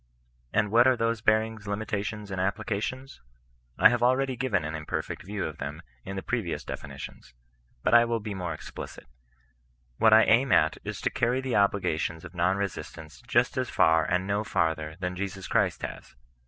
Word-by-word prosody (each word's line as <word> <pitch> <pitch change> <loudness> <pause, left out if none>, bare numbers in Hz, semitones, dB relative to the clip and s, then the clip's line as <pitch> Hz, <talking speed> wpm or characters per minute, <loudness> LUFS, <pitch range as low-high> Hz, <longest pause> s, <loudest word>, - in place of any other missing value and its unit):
And 105 -2 +1
what 120 +3 +6
are 130 -1 +4
those 115 -1 0
bearings, 110 -1 +1
limitations, 105 0 -3
and 95 -1 -2
applications? 110 - -3 0.6
I 110 - +7
haveabread^ 125 +1 +1
given 105 - 0
an 80 - -4
imperfect 80 +2 -4
view 100 +2 -4
of 80 - -6
them - - -6 0.2
in 95 0 -6
theprevious 100 -2 -3
defini - - -7
tions. 60 -1 -10 0.5
But - - +2
I 120 0 +8
will 115 -1 -1
be 105 -1 -5
more 90 -3 -4
explicit. 80 - -8 0.9
What 110 - +6
I 110 +1 +8
aim 125 +4 +3
at - - +3
is - - -5
to - - 0
carry 120 +2 +1
the 130 -2 -2
obligations 90 -5 +1
of 90 - -10
non 90 +2 +1
resistance 90 -4 -6
just 125 0 +2
as 130 - -2
far 80 0 +4
and 90 +4 0
no 100 +1 0
farther 80 -5 -1
than 90 0 -3
Jesus 95 0 -5
Christ - - +1
has. - - -7
100 Hz, 175 wpm, -27 LUFS, 90-115 Hz, 0.9 s, I